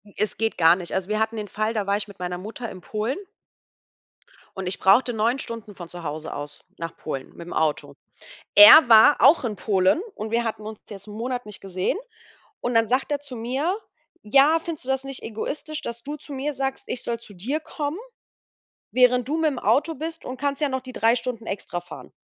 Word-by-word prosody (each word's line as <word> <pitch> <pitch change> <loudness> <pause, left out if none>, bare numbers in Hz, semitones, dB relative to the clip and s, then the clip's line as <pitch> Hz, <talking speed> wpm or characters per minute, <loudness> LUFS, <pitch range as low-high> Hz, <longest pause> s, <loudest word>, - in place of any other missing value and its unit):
Es 215 0 -1
geht 225 0 -1
gar 165 0 +6
nicht. 180 -2 -7
Also 190 0 -2
wir 215 0 0
hatten 220 +1 0
den 210 -1 -4
Fall, 215 +3 -2
da 210 -3 -1
war 200 0 +2
ich 210 0 -4
mit 200 -2 -14
meiner 180 0 -3
Mutter 220 +5 -7
in 185 -1 -10
Polen 220 - -3 1.4
und 190 -2 -4
ich 185 - -3
brauchte 235 +6 +4
9 230 +5 +1
Stunden 225 -4 -6
von 175 -2 -9
zu 175 -1 -9
Hause 155 +1 -5
aus 145 0 -7 0.2
nach 165 -1 -6
Polen 135 -4 -6
mit'm 170 +1 -8
Auto. 155 -2 -1 0.6
Er 310 -2 +11
war 225 +5 +8
auch 290 +3 +6
in 225 -4 -2
Polen 195 - +2
und 215 +1 -5
wir 235 +1 +1
hatten 220 -2 -4
uns 215 -1 -7
jetzt 200 -1 -9
'n 210 - -9
Monat 245 +1 -3
nicht 210 -2 -10
gesehen 185 - -2 0.6
und 245 - -1
dann 225 0 +4
sagt 255 +5 0
er 290 - 0
zu 280 -3 -10
mir: 265 - -1 0.5
„Ja, 275 +8 +5
findest 320 -5 -7
du - - -7
das 265 0 0
nicht 270 -1 -8
egoistisch, 295 +7 -4
dass 235 0 -6
du 290 +3 -5
zu 290 - -10
mir 280 +2 -2
sagst, 270 0 -3
ich 250 - -4
soll 235 -1 -3
zu 225 -3 -15
dir 240 - -2
kommen, 305 +1 -4 0.9
während 250 -1 +4
du 310 +3 -1
mit'm 305 -4 +1
Auto 315 +3 +2
bist 325 +3 -6
und 255 - -6
kannst 280 +2 -2
ja 295 - +2
noch 260 -1 -2
die 255 -1 -10
3 230 +1 +3
Stunden 240 -2 -4
extra 180 -3 -4
fahren?“ 175 - -11
230 Hz, 215 wpm, -24 LUFS, 200-270 Hz, 1.4 s, Er